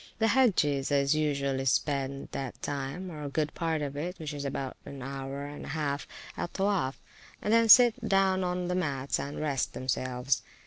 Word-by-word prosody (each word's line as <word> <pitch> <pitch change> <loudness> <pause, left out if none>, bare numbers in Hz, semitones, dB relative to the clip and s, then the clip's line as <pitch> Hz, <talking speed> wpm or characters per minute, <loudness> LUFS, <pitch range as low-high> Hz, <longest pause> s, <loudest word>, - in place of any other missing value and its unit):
The 225 0 +2
Hagges 175 - +3
do 140 -1 +3
usually 140 -3 0
spend 140 0 0
that 135 -3 -5
time, 145 +6 -4
or 150 -3 -5
good 150 +1 -1
part 160 -2 -1
of 140 -1 -4
it 175 +5 -4
(which 155 -3 -5
is 145 -1 -5
about 135 -1 -3
an 135 -2 -8
hour 135 +1 -5
and 145 0 -8
half), 145 -1 -2 0.3
at 175 - -4
Towoaf, 190 -9 +1 0.4
and 210 - 0
then 230 0 +5
sit 240 0 +7
down 190 -1 +3
on 180 0 -1
the 180 - -1
mats 140 -7 -1
and 140 +1 -4
rest 145 -4 -1
themselves. 130 0 -1
145 Hz, 175 wpm, -29 LUFS, 135-180 Hz, 0.4 s, sit